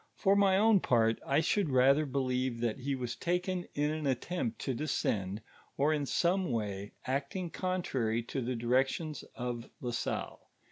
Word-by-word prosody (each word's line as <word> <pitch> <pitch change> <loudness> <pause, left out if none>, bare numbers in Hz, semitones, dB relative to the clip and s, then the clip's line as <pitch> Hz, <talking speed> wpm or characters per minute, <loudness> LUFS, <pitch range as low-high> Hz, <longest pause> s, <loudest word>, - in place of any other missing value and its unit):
For 195 -1 +3
my 195 -1 +4
own 215 0 +5
part; 115 -7 +2
I 140 +3 +3
should 185 +1 +1
rather 135 +3 +4
believe 130 -2 -1
that 120 +1 -1
he 135 +2 -1
was 125 -2 -4
taken 180 +1 -1
in 150 +1 +1
an 155 -2 -2
attempt 130 -2 -1
to 135 - -1
descend, 110 -7 -1 0.3
or 150 +3 +3
in 145 -2 -1
some 180 0 +1
way 105 -3 -3
acting 140 +7 -2
contrary 130 - -1
to 130 +3 -3
the 125 +1 -2
directions 130 +6 0
of 120 -1 -4
La 125 - -3
Salle. 120 - -3
135 Hz, 160 wpm, -32 LUFS, 120-170 Hz, 0.3 s, own